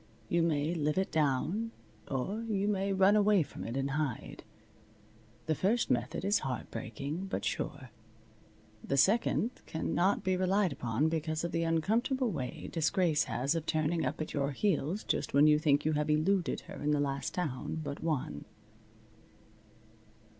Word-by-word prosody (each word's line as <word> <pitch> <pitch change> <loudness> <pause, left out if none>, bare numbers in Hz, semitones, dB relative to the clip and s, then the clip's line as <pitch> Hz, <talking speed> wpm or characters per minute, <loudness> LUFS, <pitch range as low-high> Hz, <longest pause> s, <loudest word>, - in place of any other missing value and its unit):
You 170 - +2
may 160 -1 +1
live 150 -1 0
it 190 - 0
down; 160 - +1 0.4
or 145 - -2
you 205 -3 -1
may 200 -1 0
run 195 +1 +5
away 205 -3 +4
from - - -9
it 115 +3 -4
and 135 +1 -1
hide. 145 -4 -3 1.0
The 160 - +1
first 205 - +1
method 125 +8 -1
is 205 +1 +3
heart 130 -2 -4
breaking, 140 +11 -5
but - - -3
sure. 130 -4 -3 0.9
The 140 - -1
second 220 - +3 0.2
cannot 175 +4 0
be 185 0 +1
relied 185 -1 +2
upon 125 +3 0
because 160 0 -1
of 170 - -2
the 165 - 0
uncomfortable 225 - +1
way 130 -7 -5
Disgrace 165 -1 +2
has 135 +5 0
of 165 -1 -3
turning 160 +1 +1
up 130 +4 -2
at 155 - -4
your 140 -1 0
heels 185 +2 0
just - - -1
when 145 +1 +7
you 150 0 +5
think 150 -2 +2
you 155 - +3
have 150 0 0
eluded 170 +5 +1
her - - -10
in 145 - 0
the 150 -1 +2
last 140 -1 -2
town 160 -3 -3
but 140 -1 -5
one. 155 -5 -2
160 Hz, 160 wpm, -32 LUFS, 145-190 Hz, 1.0 s, when